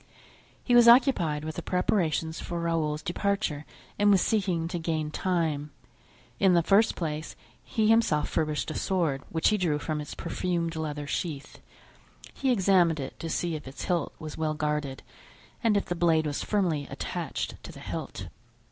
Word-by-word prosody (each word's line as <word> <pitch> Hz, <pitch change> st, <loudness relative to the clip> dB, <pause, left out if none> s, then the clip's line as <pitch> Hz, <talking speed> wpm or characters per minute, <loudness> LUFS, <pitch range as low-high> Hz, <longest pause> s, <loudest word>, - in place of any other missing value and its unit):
He 245 Hz, -, +1 dB
was 240 Hz, -1 st, +7 dB
occupied 190 Hz, -, +5 dB
with 155 Hz, -, -5 dB
the -, -, -2 dB
preparations 165 Hz, -3 st, 0 dB
for 170 Hz, -1 st, -4 dB
Raoul's 160 Hz, -3 st, -1 dB
departure 180 Hz, -5 st, -1 dB, 0.3 s
and 205 Hz, 0 st, +5 dB
was 195 Hz, -2 st, +6 dB
seeking 185 Hz, -6 st, 0 dB
to 175 Hz, -, -3 dB
gain 160 Hz, -2 st, -2 dB
time. 160 Hz, -5 st, -1 dB, 0.7 s
In 190 Hz, -2 st, +5 dB
the 170 Hz, -, +4 dB
first 200 Hz, +6 st, +4 dB
place 155 Hz, -2 st, -4 dB, 0.3 s
he 220 Hz, -4 st, 0 dB
himself 220 Hz, -10 st, +3 dB
furbished 155 Hz, -1 st, -1 dB
a -, -, -4 dB
sword, 165 Hz, -9 st, 0 dB
which 160 Hz, -1 st, +2 dB
he 215 Hz, -, +2 dB
drew 165 Hz, -5 st, +1 dB
from 150 Hz, 0 st, -3 dB
its 150 Hz, -, -7 dB
perfumed 170 Hz, -1 st, -2 dB
leather 150 Hz, -2 st, -3 dB
sheath; 145 Hz, -1 st, -4 dB, 0.7 s
he 265 Hz, -, 0 dB
examined 185 Hz, -7 st, +3 dB
it 135 Hz, -, -6 dB
to 165 Hz, -, -4 dB
see 170 Hz, +1 st, -1 dB
if 150 Hz, -3 st, -6 dB
its 135 Hz, -, -7 dB
hilt 175 Hz, -2 st, -1 dB
was 155 Hz, 0 st, -8 dB
well 155 Hz, -1 st, 0 dB
guarded 150 Hz, -3 st, -2 dB, 0.6 s
and 220 Hz, -3 st, +4 dB
if 200 Hz, -, 0 dB
the -, -, -2 dB
blade 165 Hz, -2 st, +2 dB
was 145 Hz, -1 st, -2 dB
firmly 170 Hz, -9 st, 0 dB
attached -, -, -4 dB
to -, -, -8 dB
the -, -, -12 dB
hilt. -, -, -6 dB
165 Hz, 170 wpm, -28 LUFS, 150-190 Hz, 0.7 s, was